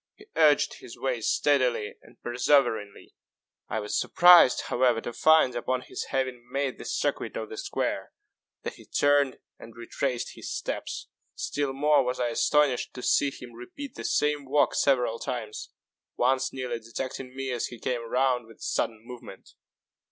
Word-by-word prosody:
He 415 - -17
urged 150 -3 +3
his 115 - -11
way 130 -3 -2
steadily 125 -4 +1
and 115 +1 -20
perseveringly. 120 -4 +1 0.6
I 110 - -1
was 105 0 -1
surprised, 175 -7 +7
however, 120 -2 +1
to 120 - -6
find, 155 -1 +4
upon 125 +1 -1
his - - -6
having 130 -2 -2
made 135 -1 -2
the - - -8
circuit - - -2
of - - -5
the 435 - -8
square, 400 +1 -3 0.5
that - - -4
he - - -16
turned 145 -2 +2 0.2
and 115 - -12
retraced 120 +1 -3
his - - -8
steps. - - -4 0.3
Still 145 -2 -2
more 145 +1 +3
was 125 0 -2
I 120 -1 +1
astonished 140 +2 +1
to 125 - -7
see 145 - +3
him 125 -3 -11
repeat 230 - -9
the - - -8
same 150 +3 0
walk 145 +2 +2
several 125 -4 +2
times 110 -4 -5 0.5
once 130 +1 +2
nearly 125 -3 -4
detecting 125 +3 -6
me 135 -1 -3
as 120 -2 -2
he 120 - -10
came 120 +1 -2
round 125 -2 +1
with 115 - -16
a - - -26
sudden 110 -2 -2
movement. 120 -6 -11
130 Hz, 165 wpm, -27 LUFS, 120-140 Hz, 0.6 s, surprised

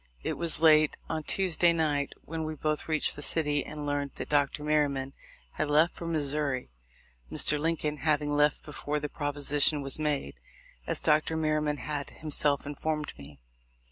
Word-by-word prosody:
It - - -2
was 170 -2 +1
late 155 -2 +5
on 160 -1 -2
Tuesday 175 0 +2
night 150 -4 -1
when 160 +1 -4
we 155 0 -4
both 155 +1 -2
reached 155 -1 +2
the 145 - -8
city 150 -1 +1
and 150 -1 -7
learned 145 -1 -2
that - - -7
Dr. 145 0 +1
Merryman 140 -3 0 0.4
had 155 - -2
left 155 +4 +3
for 170 - -6
Missouri, 145 - -2 0.6
Mr. 150 - +2
Lincoln 155 -1 -1
having 150 -1 0
left 150 -1 +2
before 150 0 -4
the 150 0 -5
propo 145 -1 -4
sition 145 +1 +5
was 135 +2 0
made, 145 - -2 0.5
as - - -1
Dr. 155 +1 +2
Merryman 155 -1 0
had 145 -1 -5
himself 145 -2 0
informed 150 +1 -3
me. 70 0 -13
150 Hz, 165 wpm, -28 LUFS, 145-155 Hz, 0.6 s, late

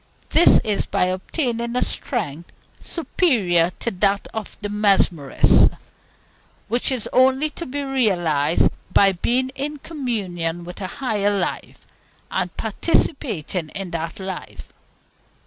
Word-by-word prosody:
This 340 - +6
is 210 -2 -1
by - - +1
obtaining 235 - -2
a 250 - +2
strength 170 - -3 0.3
superior 210 - +1
to 235 - -1
that 200 +1 +1
of 220 -2 -6
the 205 - -4
mesmerist, 195 -8 +3 1.0
which 240 +5 0
is 250 -4 -2
only 265 +4 +4
to 340 - -7
be 285 +2 -3
realized 175 - +2 0.2
by 195 -1 +5
being 245 +8 0
in 280 +3 -5
communion 195 - -3
with 175 +3 -9
a 185 - -3
Higher 205 -3 -1
Life, 175 - -4 0.5
and 180 -2 -2
participating 215 - -1
in 195 -3 -4
that 165 +1 -4
Life. 190 -1 -7
205 Hz, 120 wpm, -22 LUFS, 180-255 Hz, 1.0 s, This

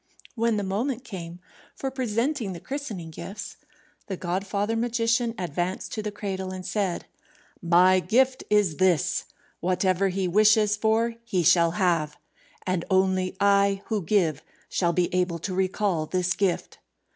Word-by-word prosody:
When 230 -2 +1
the 205 - -1
moment 230 +6 -2
came 175 -7 -8 0.4
for 270 - -4
presenting 245 -2 -1
the 170 - -7
christening 215 - -6
gifts, 195 +6 -8 0.5
the 190 - -4
godfather 200 +5 -1
magician 230 0 +1
advanced 180 +1 -3
to 215 - -2
the 210 - -3
cradle 195 -2 -4
and 185 -1 -6
said, 190 -1 -1 0.6
"My 180 +2 +5
gift 255 +7 +2
is 205 -7 +2
this: 180 -5 +2 0.3
Whatever 185 +2 +1
he 190 0 -1
wishes 210 +2 +4
for 220 +2 +1
he 190 -7 0
shall 170 +1 +5
have. 165 -6 +1 0.5
And 185 -2 0
only 190 0 +1
I 200 -1 +3
who 215 -2 0
give 165 -5 +1 0.3
shall 175 -2 +1
be 175 0 +1
able 180 -2 +1
to 185 +3 -4
recall 185 -3 0
this 185 +1 0
gift." 190 -3 -1
190 Hz, 145 wpm, -26 LUFS, 180-215 Hz, 0.6 s, My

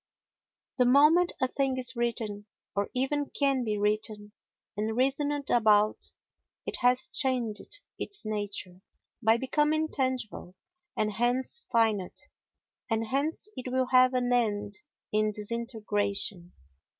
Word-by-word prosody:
The 250 - +5
moment 305 +7 +5
a 260 - +2
thing 270 0 -1
is 255 0 0
written, 225 -3 -2 0.3
or 200 0 0
even 280 +3 0
can 275 -3 +1
be 215 -2 -1
written, 210 0 -2 0.4
and 215 +2 -2
reasoned 285 +2 0
about, 215 -2 +3 0.5
it - - -3
has 250 +1 +3
changed 255 - -2 0.2
its 405 - -2
nature 205 -4 -4 0.4
by 225 0 +4
becoming 300 +5 +1
tangible, 255 - -2 0.4
and 215 0 +1
hence 245 - 0
finite, 220 -5 +1 0.6
and 225 0 0
hence 290 - -1
it 255 0 -5
will 255 0 +1
have 255 0 +6
an 245 -1 +1
end 205 -4 0 0.4
in 215 0 +2
disintegration. 205 -4 -2
240 Hz, 120 wpm, -29 LUFS, 210-260 Hz, 0.6 s, have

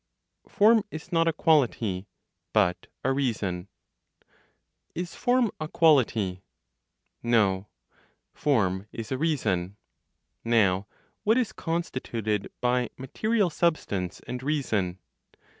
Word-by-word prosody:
FORM 220 +2 +5
IS 160 0 -8
NOT 165 -1 +3
A 165 - +3
QUALITY; 120 - +2 0.5
BUT 90 0 +2 0.2
A 135 - +2
REASON. 105 -9 -1 1.3
Is 175 0 -4
form 245 -3 +2
a 155 - -3
quality? 115 - +3 0.8
No: 105 -5 +2 0.7
form 100 -9 +1
is 115 +1 -7
a 130 - 0
reason. 100 - 0 0.7
Now 100 -4 +2 0.4
what 220 +3 +4
is 250 -5 0
constituted 115 - -2
by 125 -1 +1
(material) 200 - 0
substance, 105 - -1
and 125 0 -6
reason? 110 -11 -1
125 Hz, 100 wpm, -27 LUFS, 100-165 Hz, 1.3 s, FORM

